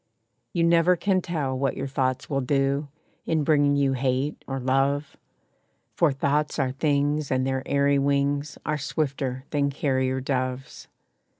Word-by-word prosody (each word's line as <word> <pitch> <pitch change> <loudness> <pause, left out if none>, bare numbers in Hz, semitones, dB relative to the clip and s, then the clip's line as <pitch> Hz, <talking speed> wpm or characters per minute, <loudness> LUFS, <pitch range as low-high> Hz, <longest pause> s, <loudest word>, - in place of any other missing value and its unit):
You 170 - 0
never 170 +1 +4
can 185 +1 +1
tell 150 -7 -2
what 135 +1 -1
your 135 - -3
thoughts 130 -1 -1
will 140 -2 -1
do, 135 +2 0 0.4
In 160 -2 +1
bringing 145 -1 +3
you 140 -1 +2
hate 130 +2 -1
or 135 0 -3
love; 135 +3 0 0.8
For 165 -4 +3
thoughts 145 +2 0
are 135 -3 0
things, 145 +1 0
and 130 0 +1
their 130 0 -1
airy 140 0 +2
wings 140 +1 0
Are 150 0 -1
swifter 135 -3 -2
than 145 -1 +1
carrier 130 -2 0
doves. 130 -1 -3
140 Hz, 145 wpm, -25 LUFS, 130-150 Hz, 0.8 s, never